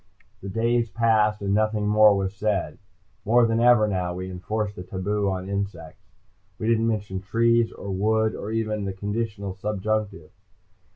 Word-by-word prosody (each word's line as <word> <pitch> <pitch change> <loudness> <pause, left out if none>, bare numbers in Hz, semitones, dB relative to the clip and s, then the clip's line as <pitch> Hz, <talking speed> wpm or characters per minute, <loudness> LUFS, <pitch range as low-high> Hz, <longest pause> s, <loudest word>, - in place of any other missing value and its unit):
The 100 - -6
days 115 +3 +1
passed 110 -1 +2
and 100 0 0
nothing 110 0 +1
more 105 -1 +6
was 95 0 -2
said. 100 -6 -2 0.4
More 120 +3 +4
than 115 0 +1
ever 120 -3 +5
now, 90 -3 -2
we 95 +1 -5
enforced 105 +3 -3
the - - -7
taboo 100 +2 -2
on 95 0 -4
insects. 100 -5 -5 0.5
We 110 - -3
didn't 115 0 +2
mention 100 -4 -2
trees, 115 +3 +2
or 100 - -7
wood, 110 +3 +1
or 105 - -6
even 110 -2 -2
the 95 - -3
conditional 100 0 -4
subjunctive. 105 -3 -3
105 Hz, 160 wpm, -24 LUFS, 95-110 Hz, 0.5 s, more